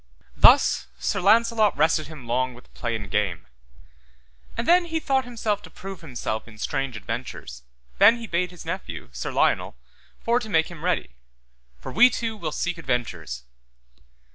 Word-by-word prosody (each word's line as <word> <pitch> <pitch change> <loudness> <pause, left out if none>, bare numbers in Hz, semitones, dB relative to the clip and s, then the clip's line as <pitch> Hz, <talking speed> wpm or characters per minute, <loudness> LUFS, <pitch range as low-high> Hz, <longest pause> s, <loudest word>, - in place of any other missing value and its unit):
Thus 60 - +6
Sir 125 - -1
Launcelot 220 0 +4
rested 155 0 +2
him 150 -5 -10
long 125 +1 0
with 125 - -18
play 120 -2 -3
and 105 -2 -5
game. 90 -6 -1 1.1
And 230 - -2
then 350 +1 +5
he 325 -1 -2
thought 270 -4 +1
himself 220 -4 -2
to - - -12
prove 195 -1 -9
himself 120 -7 -4
in 110 -2 -14
strange 130 +2 -2
adventures, 110 - -6 0.4
then 225 +4 +7
he 235 - -7
bade 180 -2 0
his 175 -1 -12
nephew, 185 - -5
Sir - - -4
Lionel, - - +1 0.4
for 235 +1 +2
to 225 -3 -7
make 160 -3 +2
him 165 -2 -10
ready; 180 - 0 0.7
for 60 - -8
we 245 +2 +7
two 225 -2 -3
will 170 -7 -4
seek 175 +2 -2
adventures. 90 - -3
165 Hz, 165 wpm, -25 LUFS, -, 1.1 s, then